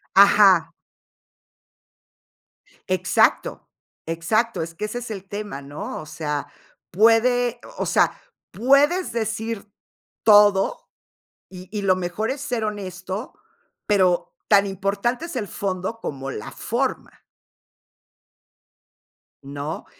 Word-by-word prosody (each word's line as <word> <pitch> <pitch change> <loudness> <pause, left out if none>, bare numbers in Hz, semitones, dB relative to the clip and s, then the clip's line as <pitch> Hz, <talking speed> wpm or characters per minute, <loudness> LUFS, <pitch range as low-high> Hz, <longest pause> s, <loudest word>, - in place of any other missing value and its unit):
Ajá. 195 -4 +6 2.2
Exacto. - - +1 0.4
Exacto. 175 +5 0
Es 165 +1 -8
que 210 +6 -4
ese 215 +3 -5
es 240 -2 -7
el 195 -2 -7
tema, 205 -8 -5
¿no? 145 +2 -7
O 155 - -10
sea, 150 -2 -4 0.4
puede, 235 +4 +3 0.2
o - - -1
sea, - - +3 0.4
puedes 280 - +3
decir 220 -2 -3 0.5
todo, 205 -2 +5 0.6
y 185 -1 -11
y 205 - -3
lo 185 -1 +4
mejor 185 +6 -2
es 275 - -4
ser 245 -6 -2
honesto, 195 - -5 0.5
pero 195 - +2
tan 200 -1 +5
importante 200 - -2
es 310 - -8
el 210 - -2
fondo 195 +3 -4
como 135 -5 -5
la 105 - -7
forma. - - -3 2.3
¿No? 145 +3 -6
200 Hz, 105 wpm, -23 LUFS, 180-225 Hz, 2.3 s, Ajá